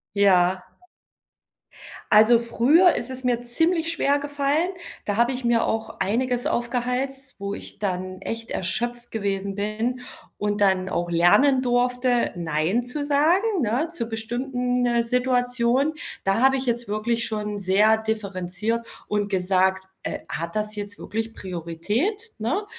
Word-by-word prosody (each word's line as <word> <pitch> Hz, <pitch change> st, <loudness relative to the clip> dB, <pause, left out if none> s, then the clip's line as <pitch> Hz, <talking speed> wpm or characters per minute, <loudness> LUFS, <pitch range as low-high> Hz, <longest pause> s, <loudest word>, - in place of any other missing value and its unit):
Ja. 185 Hz, -2 st, +3 dB, 1.4 s
Also, 220 Hz, +2 st, +7 dB
früher 270 Hz, +10 st, +4 dB
ist 240 Hz, -, -4 dB
es 260 Hz, 0 st, -7 dB
mir 245 Hz, -1 st, +1 dB
ziemlich 325 Hz, +7 st, +1 dB
schwergefallen. 290 Hz, +2 st, 0 dB, 0.3 s
Da 205 Hz, -, -1 dB
habe 235 Hz, +4 st, +3 dB
ich 255 Hz, -1 st, -4 dB
mir 235 Hz, -1 st, +3 dB
auch 220 Hz, 0 st, -3 dB
einiges 245 Hz, +5 st, 0 dB
aufgehalst, 250 Hz, +3 st, -2 dB
wo 200 Hz, 0 st, -3 dB
ich -, -, -8 dB
dann 185 Hz, -2 st, -3 dB
echt 230 Hz, 0 st, -5 dB
erschöpft 240 Hz, +5 st, -1 dB
gewesen 200 Hz, -2 st, -2 dB
bin 220 Hz, +5 st, -2 dB, 0.4 s
und 205 Hz, 0 st, -1 dB
dann 190 Hz, -2 st, +2 dB
auch 175 Hz, -1 st, -2 dB
lernen 205 Hz, +11 st, +4 dB
durfte, 245 Hz, 0 st, +1 dB
nein 170 Hz, +7 st, 0 dB
zu 285 Hz, +4 st, -4 dB
sagen, 345 Hz, +8 st, +2 dB
ne, 245 Hz, +8 st, 0 dB
zu 235 Hz, -9 st, -4 dB
bestimmten, 245 Hz, +2 st, -1 dB
äh, 235 Hz, -1 st, +2 dB
Situationen. 250 Hz, +3 st, +1 dB, 0.3 s
Da 195 Hz, +4 st, +2 dB
habe 270 Hz, 0 st, +5 dB
ich 265 Hz, -, -3 dB
jetzt 240 Hz, -2 st, -1 dB
wirklich 230 Hz, +3 st, 0 dB
schon 210 Hz, -1 st, -3 dB
sehr 200 Hz, +3 st, +4 dB
differenziert 215 Hz, +1 st, -3 dB, 0.2 s
und 205 Hz, -1 st, -1 dB
gesagt: 190 Hz, 0 st, +1 dB, 0.2 s
„Äh, -, -, -3 dB
hat 170 Hz, +3 st, -5 dB
das 215 Hz, 0 st, -2 dB
jetzt 205 Hz, -1 st, -5 dB
wirklich 225 Hz, +1 st, -4 dB
Priorität, 205 Hz, -, -3 dB
ne? 285 Hz, -, -1 dB
235 Hz, 135 wpm, -24 LUFS, 200-255 Hz, 1.4 s, Also